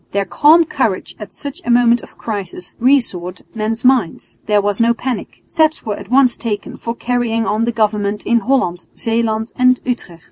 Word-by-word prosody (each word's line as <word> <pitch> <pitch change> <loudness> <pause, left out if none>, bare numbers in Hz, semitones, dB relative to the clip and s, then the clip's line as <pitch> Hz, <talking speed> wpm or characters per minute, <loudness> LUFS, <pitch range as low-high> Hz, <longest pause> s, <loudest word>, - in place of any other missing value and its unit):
Their 200 0 0
calm 320 - +5
courage 230 - -2
at 210 -2 -8
such 280 -1 -8
a - - -5
moment 240 0 +4
of - - -15
crisis 195 -5 -6
reassured 225 -9 +1
men's 225 +2 -3
minds. 250 -10 +1
There 210 -1 +3
was 205 +1 -1
no 235 0 +3
panic. 250 +1 -5
Steps 315 -1 +1
were 210 -2 -2
at 200 0 -11
once 255 -1 +4
taken 210 -3 -4
for 230 0 -5
carrying 235 -2 -1
on 215 +2 0
the 235 - 0
government 210 -2 -1
in 235 +1 +3
Holland, 215 -8 0
Zeeland 225 -1 -1
and 255 0 +4
Utrecht. 235 -9 -4
230 Hz, 180 wpm, -17 LUFS, 205-245 Hz, -, calm